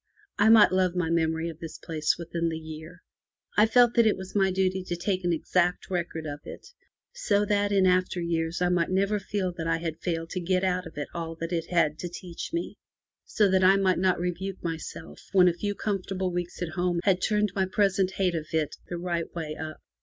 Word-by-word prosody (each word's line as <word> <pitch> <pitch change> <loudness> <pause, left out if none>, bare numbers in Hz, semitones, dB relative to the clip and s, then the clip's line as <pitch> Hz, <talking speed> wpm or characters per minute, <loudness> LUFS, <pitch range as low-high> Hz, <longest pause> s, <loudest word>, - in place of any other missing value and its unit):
I 210 +2 +5
might 220 -2 +7
love 185 -1 +2
my 170 -2 0
memory 160 0 +1
of 165 -1 -7
this 165 -1 -7
place 155 -2 -1
within 170 0 -2
the 160 - -3
year. 160 +2 -10 0.5
I 210 +1 +5
felt 240 +1 +5
that 235 -1 +5
it 215 - +2
was 190 0 -8
my 195 -2 +3
duty 190 0 0
to 175 - -2
take 185 +2 -2
an 175 - +1
exact 175 +3 0
record 170 -3 -3
of 145 -1 -5
it, - - -10 0.4
so 210 - +1
that 205 0 +1
in 195 -2 +4
after 185 0 +2
years 170 0 -1
I 175 - +2
might 175 -2 +1
never 200 +3 +1
feel 195 -2 -2
that 165 - -2
I 165 0 +2
had 165 -1 -4
failed 165 -2 -3
to 185 - -2
get 185 +1 0
out 180 -1 0
of 160 - -14
it 145 - -3
all 165 -1 -4
that 165 +2 -5
it 165 -1 -1
had 160 -3 +2
to 175 - -4
teach 175 0 -7
me; 340 +1 -3 0.5
so 210 - +2
that 190 0 +3
I 190 +1 +7
might 190 -2 +2
not 185 -1 +2
rebuke 180 +2 -4
myself 85 - -6
when 185 -2 +6
a 175 - +4
few 205 +4 -3
comfortable 190 -2 -2
weeks 175 0 -3
at 175 - -3
home 175 +2 0
had 185 -2 +2
turned 210 -1 +1
my 190 -1 0
present 195 -1 +1
hate 185 -3 +1
of 160 -2 -3
it 155 -2 -1
the 175 - -3
right 170 -1 -3
way 155 -2 -4
up. 155 0 -6
180 Hz, 225 wpm, -27 LUFS, 165-190 Hz, 0.5 s, might